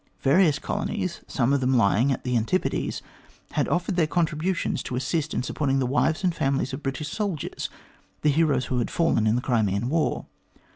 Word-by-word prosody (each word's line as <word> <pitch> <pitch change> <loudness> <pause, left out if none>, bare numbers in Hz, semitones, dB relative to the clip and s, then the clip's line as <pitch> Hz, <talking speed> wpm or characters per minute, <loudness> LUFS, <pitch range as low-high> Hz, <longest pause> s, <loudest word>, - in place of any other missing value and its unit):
Various 150 +2 +4
colonies, - - -3
some 125 +4 +1
of 140 - +2
them 130 +1 +2
lying 115 +4 +3
at 130 - -2
the 125 -1 -1
Antipodes, 120 +11 0 0.5
had - - 0
offered 180 +1 0
their 160 -3 +3
contributions 165 -1 0
to 125 - -5
assist 150 +5 -1
in - - -1
supporting 135 +1 0
the 135 - +1
wives 155 +7 +1
and 180 -2 +2
families 135 -3 0
of 135 - -5
British 135 +2 -3
soldiers, 200 -9 -3 0.5
the 150 - +4
heroes 150 -4 +2
who 125 - -1
had 120 - -1
fallen 165 -10 +2
in 110 - +3
the 125 - 0
Crimean 110 -1 +1
war. 160 +2 0
140 Hz, 185 wpm, -25 LUFS, 125-165 Hz, 0.5 s, Various